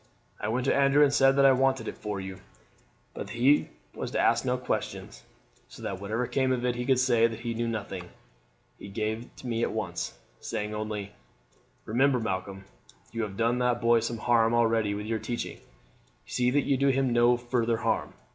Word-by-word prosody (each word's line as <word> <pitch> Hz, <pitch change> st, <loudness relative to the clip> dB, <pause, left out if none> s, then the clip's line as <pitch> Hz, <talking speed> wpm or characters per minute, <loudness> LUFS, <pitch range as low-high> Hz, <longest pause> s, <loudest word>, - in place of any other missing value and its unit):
I 105 Hz, -, -3 dB
went 125 Hz, +3 st, -1 dB
to -, -, +3 dB
Andrew 140 Hz, +1 st, +5 dB
and 140 Hz, -1 st, +3 dB
said 135 Hz, -1 st, +5 dB
that 140 Hz, 0 st, +5 dB
I 135 Hz, -, +8 dB
wanted 130 Hz, -2 st, +1 dB
it -, -, -4 dB
for 105 Hz, -2 st, -4 dB
you, 95 Hz, 0 st, -7 dB, 0.7 s
but -, -, -6 dB
that -, -, -8 dB
he 135 Hz, +5 st, +3 dB, 0.2 s
was -, -, -5 dB
to -, -, -2 dB
ask 115 Hz, 0 st, +3 dB
no 125 Hz, -1 st, 0 dB
questions, 95 Hz, -, -4 dB, 0.5 s
so -, -, -12 dB
that 95 Hz, -1 st, -4 dB
whatever 110 Hz, +5 st, -1 dB
came 130 Hz, +2 st, 0 dB
of 125 Hz, -1 st, 0 dB
it 125 Hz, -, +1 dB
he 120 Hz, +1 st, -4 dB
could 130 Hz, -2 st, +4 dB
say 120 Hz, -3 st, +4 dB
that 115 Hz, 0 st, -7 dB
he 120 Hz, -1 st, -3 dB
knew 115 Hz, +1 st, -2 dB
nothing. 100 Hz, -5 st, -5 dB, 0.7 s
He -, -, -9 dB
gave 110 Hz, +3 st, -3 dB
it -, -, -16 dB
me 115 Hz, -2 st, -2 dB
at -, -, 0 dB
once, -, -, -4 dB, 0.2 s
saying 105 Hz, 0 st, -4 dB
only: 105 Hz, -1 st, -4 dB, 0.7 s
"'Remember, 130 Hz, +3 st, +2 dB
Malcolm, 95 Hz, -2 st, -4 dB, 0.5 s
you 115 Hz, -, -3 dB
have 100 Hz, -3 st, -4 dB
done 115 Hz, +2 st, +1 dB
the 125 Hz, -1 st, +2 dB
boy 115 Hz, 0 st, +3 dB
some 115 Hz, +1 st, -3 dB
harm 115 Hz, 0 st, +3 dB
already 115 Hz, -3 st, +2 dB
with 105 Hz, +1 st, -5 dB
your 110 Hz, 0 st, -1 dB
teaching, 120 Hz, +1 st, -4 dB, 0.7 s
see 125 Hz, 0 st, 0 dB
that 140 Hz, +2 st, +1 dB
you 135 Hz, -, +2 dB
do 140 Hz, +1 st, +2 dB
him 135 Hz, -2 st, +2 dB
no 120 Hz, +1 st, +4 dB
further 120 Hz, -1 st, 0 dB
harm. 115 Hz, -1 st, -1 dB
120 Hz, 205 wpm, -28 LUFS, 110-125 Hz, 0.7 s, I